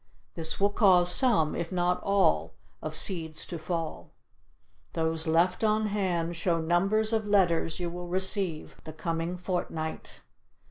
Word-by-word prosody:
This 160 Hz, -1 st, -2 dB
will 200 Hz, +1 st, +3 dB
cause 180 Hz, -4 st, +4 dB
some, 210 Hz, -, +3 dB
if 170 Hz, +1 st, -4 dB
not 180 Hz, 0 st, 0 dB
all, 200 Hz, -1 st, +1 dB, 0.3 s
of -, -, -5 dB
seeds 160 Hz, -5 st, 0 dB
to 170 Hz, -, -6 dB
fall. 160 Hz, -, -4 dB, 0.8 s
Those 160 Hz, 0 st, -1 dB
left 170 Hz, +5 st, +2 dB
on 215 Hz, 0 st, +2 dB
hand 175 Hz, -5 st, -1 dB
show 170 Hz, 0 st, 0 dB
number 175 Hz, +6 st, +2 dB
of 220 Hz, -1 st, 0 dB
letters 175 Hz, -5 st, +2 dB
you 175 Hz, -1 st, -3 dB
will 175 Hz, 0 st, -7 dB
receive 185 Hz, -2 st, -1 dB
the 155 Hz, -, -8 dB
coming 165 Hz, +2 st, -3 dB
fortnight. 175 Hz, -3 st, -4 dB
175 Hz, 140 wpm, -28 LUFS, 165-195 Hz, 0.8 s, cause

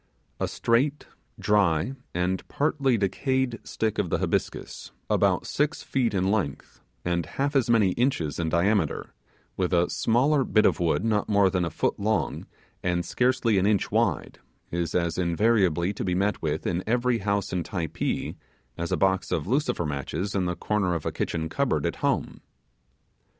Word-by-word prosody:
A -, -, 0 dB
straight, 135 Hz, +6 st, +1 dB, 0.3 s
dry, 100 Hz, +1 st, +2 dB, 0.2 s
and 90 Hz, +2 st, -1 dB
partly 140 Hz, -4 st, +1 dB
decayed 125 Hz, +4 st, 0 dB
stick 110 Hz, -1 st, -2 dB
of 95 Hz, -4 st, 0 dB
the -, -, +1 dB
Hibiscus, -, -, -3 dB, 0.2 s
about -, -, +2 dB
six 150 Hz, +2 st, -1 dB
feet 120 Hz, -5 st, 0 dB
in 95 Hz, +1 st, +1 dB
length, 85 Hz, -11 st, -3 dB, 0.2 s
and 85 Hz, -1 st, 0 dB
half 140 Hz, +2 st, -2 dB
as 130 Hz, -3 st, +2 dB
many 110 Hz, -5 st, +4 dB
inches 105 Hz, -, 0 dB
in 80 Hz, -1 st, 0 dB
diameter, 85 Hz, -1 st, +1 dB, 0.4 s
with 90 Hz, -1 st, 0 dB
a 85 Hz, 0 st, +2 dB
small, 135 Hz, +5 st, +2 dB
bit 110 Hz, -3 st, +3 dB
of -, -, +3 dB
wood 85 Hz, +5 st, +1 dB
not 105 Hz, -2 st, +1 dB
more 100 Hz, -2 st, +4 dB
than 90 Hz, -2 st, 0 dB
a 85 Hz, -, -1 dB
foot -, -, -1 dB
long, 110 Hz, +2 st, -1 dB, 0.3 s
and 85 Hz, -1 st, 0 dB
scarcely 125 Hz, -1 st, +2 dB
an 95 Hz, -, +2 dB
inch 105 Hz, -3 st, +1 dB
wide, -, -, 0 dB, 0.3 s
is 85 Hz, -1 st, -2 dB
as 85 Hz, -1 st, 0 dB
invariably 90 Hz, -1 st, +2 dB
to -, -, -4 dB
be 90 Hz, -2 st, 0 dB
met 100 Hz, +3 st, 0 dB
with 80 Hz, -1 st, -2 dB
in 90 Hz, +1 st, -1 dB
every 120 Hz, +1 st, +1 dB
house 100 Hz, -1 st, -1 dB
in 90 Hz, -, 0 dB
Typee 85 Hz, -3 st, -3 dB, 0.4 s
as 85 Hz, 0 st, -3 dB
a -, -, +1 dB
box 95 Hz, 0 st, +1 dB
of 75 Hz, -, 0 dB
lucifer 125 Hz, -, 0 dB
matches 75 Hz, +7 st, -3 dB
in 95 Hz, -2 st, 0 dB
the 90 Hz, 0 st, -1 dB
corner 100 Hz, -4 st, 0 dB
of 85 Hz, -, -4 dB
a -, -, 0 dB
kitchen 80 Hz, -1 st, -2 dB
cupboard -, -, 0 dB
at -, -, -2 dB
home. -, -, -1 dB
100 Hz, 170 wpm, -26 LUFS, 85-115 Hz, 0.4 s, many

